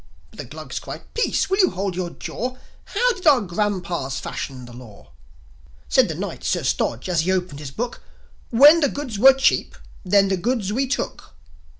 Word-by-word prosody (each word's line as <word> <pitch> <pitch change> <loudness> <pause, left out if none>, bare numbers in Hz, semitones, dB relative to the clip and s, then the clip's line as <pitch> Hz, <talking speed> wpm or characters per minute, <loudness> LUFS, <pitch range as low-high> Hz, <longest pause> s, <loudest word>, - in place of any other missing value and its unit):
But - - -17
the - - -5
Glugs - - -7
cried, - - -10
"Peace! 465 - 0
Will 385 +1 0
you 370 -4 +5
hold 190 0 -3
your 180 -1 -3
jaw! 250 +8 -5 0.3
How - - +1
did 370 -4 -5
our 285 -4 +7
grandpas 175 -7 -2
fashion 130 -2 -6
the 120 - -13
law?" 105 - -14 0.8
Said - - +4
the - - -4
Knight, - - -6
Sir - - 0
Stodge, 115 +7 -1
as 175 -2 0
he 180 +3 0
opened 180 -6 -2
his 145 -3 -7
Book, 235 - -5 0.5
"When 290 +8 +7
the 285 -4 +2
goods 260 -8 -5
were 265 +4 +8
cheap 270 - +1 0.3
then 195 +1 +4
the 190 - +1
goods 210 0 -1
we 265 +3 0
took." 265 - -4
200 Hz, 190 wpm, -22 LUFS, 170-270 Hz, 0.8 s, were